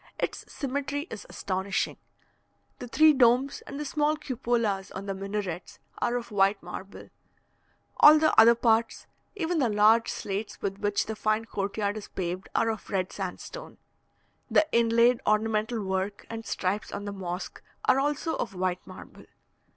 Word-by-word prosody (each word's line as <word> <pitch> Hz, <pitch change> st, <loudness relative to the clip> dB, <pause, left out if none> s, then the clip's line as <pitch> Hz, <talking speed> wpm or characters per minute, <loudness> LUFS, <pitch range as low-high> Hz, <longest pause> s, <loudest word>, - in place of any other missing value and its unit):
Its -, -, -4 dB
symmetry 285 Hz, +2 st, -3 dB
is -, -, -8 dB
astonishing. 190 Hz, +1 st, -2 dB, 0.8 s
The 245 Hz, -, -6 dB
three 310 Hz, +5 st, +6 dB
domes, 255 Hz, +1 st, +3 dB
and 280 Hz, -, -6 dB
the 300 Hz, -, -3 dB
small 295 Hz, +2 st, +1 dB
cupolas 235 Hz, -8 st, -1 dB
on 195 Hz, -, -6 dB
the 195 Hz, -, -2 dB
minarets, 195 Hz, -3 st, -5 dB, 0.2 s
are 240 Hz, -, 0 dB
of 240 Hz, -2 st, -4 dB
white 195 Hz, -1 st, +2 dB
marble; 185 Hz, +3 st, -9 dB, 0.9 s
all 305 Hz, +1 st, +9 dB
the 310 Hz, 0 st, +3 dB
other 230 Hz, +2 st, +8 dB
parts, 230 Hz, -1 st, +1 dB, 0.3 s
even 345 Hz, -3 st, -1 dB
the 255 Hz, -5 st, +2 dB
large 215 Hz, +2 st, +4 dB
slates 200 Hz, +2 st, -4 dB
with 195 Hz, 0 st, -3 dB
which 205 Hz, 0 st, 0 dB
the 220 Hz, -, -4 dB
fine 215 Hz, +1 st, 0 dB
court 200 Hz, -2 st, -4 dB
yard 205 Hz, 0 st, -1 dB
is 210 Hz, -, -7 dB
paved, 185 Hz, 0 st, -4 dB
are 225 Hz, -, +3 dB
of 220 Hz, -, -8 dB
red 190 Hz, -2 st, -1 dB
sandstone. 195 Hz, -, -7 dB, 0.7 s
The 310 Hz, -, +4 dB
inlaid 235 Hz, +1 st, +4 dB
ornamental 215 Hz, +1 st, +1 dB
work 190 Hz, +1 st, -3 dB
and 225 Hz, 0 st, -6 dB
stripes 195 Hz, +3 st, -2 dB
on 205 Hz, -, -5 dB
the 205 Hz, -, -4 dB
mosque, 180 Hz, -1 st, -6 dB, 0.2 s
are 265 Hz, -, +4 dB
also 295 Hz, +3 st, -1 dB
of 195 Hz, -4 st, -4 dB
white 180 Hz, 0 st, -1 dB
marble. -, -, -12 dB
220 Hz, 160 wpm, -27 LUFS, 195-245 Hz, 0.9 s, all